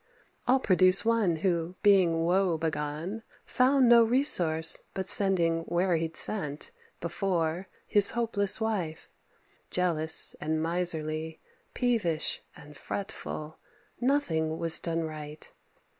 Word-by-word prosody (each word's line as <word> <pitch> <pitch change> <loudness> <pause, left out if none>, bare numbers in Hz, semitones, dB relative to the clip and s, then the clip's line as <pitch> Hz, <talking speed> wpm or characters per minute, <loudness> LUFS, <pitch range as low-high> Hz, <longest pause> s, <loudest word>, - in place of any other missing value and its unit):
I'll 260 +2 +3
produce 185 -2 +3
one 225 -7 +1
who, 170 +1 -2
being 180 -5 +3
woe 180 -1 +1
begone, 160 +6 -5 0.2
Found 260 0 +2
no 235 -1 +6
resource 175 - +3 0.2
but 190 -1 -4
sending 175 -5 +3
where 175 +1 0
he'd 165 0 -4
sent 150 -9 -1 0.3
Before 170 0 -3 0.2
his 205 -1 +4
hopeless 220 -4 +1
wife, 195 -8 -4 0.6
jealous 160 -3 +3
and 155 +1 -2
miserly, 160 -2 -2 0.4
Peevish 215 -11 -1
and 150 +1 -15
fretful; 160 -6 -7 0.4
nothing 165 - -1
was 165 0 +1
done 165 -1 -3
right. 155 -1 -9
175 Hz, 110 wpm, -27 LUFS, 160-200 Hz, 0.6 s, no